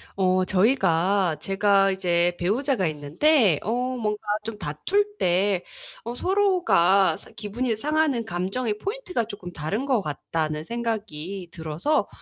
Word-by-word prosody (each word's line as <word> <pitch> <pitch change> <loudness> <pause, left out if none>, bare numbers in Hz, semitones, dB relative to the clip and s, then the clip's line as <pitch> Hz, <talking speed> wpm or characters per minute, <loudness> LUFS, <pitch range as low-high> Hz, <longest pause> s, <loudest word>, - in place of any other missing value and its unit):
어 185 -1 +2
저희가 190 - +2
제가 195 +1 +3
이제 175 -2 +1
배우자가 220 +4 0
있는데 160 - +2
어 215 - 0 0.3
뭔가 210 -3 -2 0.2
좀 225 -1 -6
다툴 400 - -1
때 185 - +1 0.4
어 235 - -5
서로가 360 - +3
사 - - -12
'기분이 225 +3 -3
상하는 300 -2 +1
감정의 205 +5 -2
포인트가 390 - -3
쪼끔 205 -5 -8
다른 195 - -3
것 255 -6 +2
같다.'는 155 +1 -3
생각이 200 -6 -4
들어서 160 - -1
200 Hz, 265 characters per minute, -25 LUFS, 175-245 Hz, 0.4 s, 제가